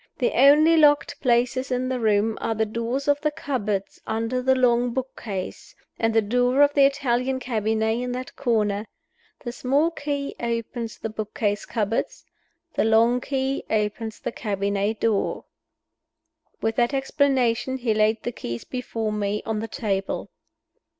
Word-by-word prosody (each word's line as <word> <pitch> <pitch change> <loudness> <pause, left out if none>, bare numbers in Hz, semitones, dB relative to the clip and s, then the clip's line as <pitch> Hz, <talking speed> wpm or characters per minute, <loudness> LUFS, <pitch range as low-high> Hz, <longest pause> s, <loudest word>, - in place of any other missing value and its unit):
The 245 - +1
only 300 +5 +6
locked 295 -2 +4
places 250 +1 +1
in 255 0 -1
the 255 -1 -1
room 215 0 +2
are 225 - -1
the 220 +1 +1
doors 235 +5 -3
of 290 0 +2
the 305 - +2
cupboards 215 -10 -3
under 230 +3 -1
the 265 +1 +3
long 245 -1 +2
book 260 0 -3
case, 195 -5 -6 0.2
and 225 0 +2
the 225 0 +3
door 250 +5 +3
of 290 0 +3
the 280 -1 +6
Italian 265 -2 +1
cabinet 220 -2 0
in 250 0 -3
that 255 +1 -6
corner. 215 -5 0 0.5
The 240 - -5
small 280 +7 +1
key 285 -3 -3
opens 230 -1 -3
the 225 - -5
book 215 -1 -6
case 205 -2 -1
cupboards; 220 -1 -2 0.5
the - - +1
long 230 +3 +4
key 270 0 -2
opens 220 +1 -1
the - - -4
cabinet 200 0 -1
door." 220 -3 0 1.2
With 225 0 0
that 240 +3 +2
explanation, 265 -2 +1
he 240 -3 0
laid 215 +1 +2
the 240 - -2
keys 120 - -6
before 230 -4 -3
me 210 0 -2
on 220 -2 -1
the 225 - -4
table. 195 -3 -3
235 Hz, 155 wpm, -24 LUFS, 220-260 Hz, 1.2 s, only